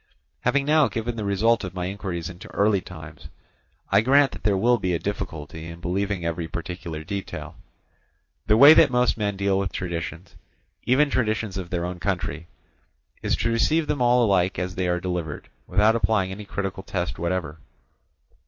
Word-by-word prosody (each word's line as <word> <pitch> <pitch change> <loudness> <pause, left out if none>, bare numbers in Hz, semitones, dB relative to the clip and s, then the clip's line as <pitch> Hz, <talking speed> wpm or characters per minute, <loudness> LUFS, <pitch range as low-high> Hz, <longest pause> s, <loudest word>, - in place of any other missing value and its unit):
Having 140 0 +1
now 150 -1 +4
given 115 +1 -3
the 110 - -4
result 105 +4 +2
of 95 -1 -6
my 90 -1 -2
inquiries 90 -3 -4
into 90 0 -10
early 100 -1 +3
times, 80 -5 -11 0.6
I 100 +1 +5
grant 135 +4 +4
that - - -10
there 105 -2 +2
will 120 +4 +3
be 90 -2 0
a - - +1
difficulty 80 -6 -5
in 85 0 -9
believing 95 +1 -2
every 85 0 -2
particular 85 -1 -6
detail. 100 +4 -6 0.9
The 105 0 +5
way 145 +6 +10
that 160 -2 +6
most 125 -1 +2
men 105 -3 -2
deal 100 0 +1
with 100 -1 -2
traditions, 85 -1 -5 0.5
even 140 +4 +3
traditions 110 -5 0
of 90 -3 -5
their 85 -1 -2
own 90 0 -5
country, 85 -3 -3 0.7
is - - +1
to 115 - -1
receive 155 +8 +2
them 150 -3 -2
all 120 0 +4
alike 95 -3 +2
as 90 +1 -3
they 95 0 -1
are 90 0 +1
delivered, 90 -4 -4 0.2
without 105 +4 +3
applying 110 -5 +1
any 105 +2 -7
critical 95 -1 -4
test 90 -3 -4
whatever. 85 -3 -2
95 Hz, 175 wpm, -24 LUFS, 85-110 Hz, 0.9 s, way